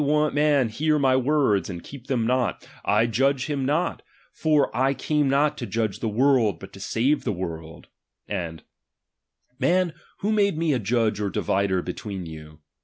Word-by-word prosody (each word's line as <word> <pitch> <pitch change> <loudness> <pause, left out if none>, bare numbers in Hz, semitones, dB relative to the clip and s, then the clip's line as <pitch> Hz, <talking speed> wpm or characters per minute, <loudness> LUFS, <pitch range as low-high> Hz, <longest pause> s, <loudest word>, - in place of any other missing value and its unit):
If - - -1
any 150 +1 +2
man 145 -4 +3
hear 150 +7 +1
my 135 -3 +3
words, 130 -7 +2
and 85 -3 -7
heep 135 -2 -11
them 125 -5 0
not, 125 -1 0 0.2
I 105 +3 +3
Judge 135 +4 +1
him 140 -3 -2
not 160 +5 0 0.4
ijor 155 -3 +3
I 135 +2 +1
came 150 +1 0
not 145 +2 +2
to 120 - -4
judge 110 0 -2
the 115 - -2
world, 120 -1 +2
but 95 - -11
to 95 - -11
saee 120 +8 +1
the 145 - -2
world: 80 -4 -6 0.4
and, 80 -3 -4 1.0
Man, 180 -1 +2 0.3
icho 210 +2 +2
made 200 -5 +2
me 160 -2 +1
a 130 - +1
judge 110 -1 0
or 105 -1 -1
divider 95 -1 0
between 95 0 -5
you 75 -1 -11
130 Hz, 180 wpm, -24 LUFS, 100-145 Hz, 1.0 s, man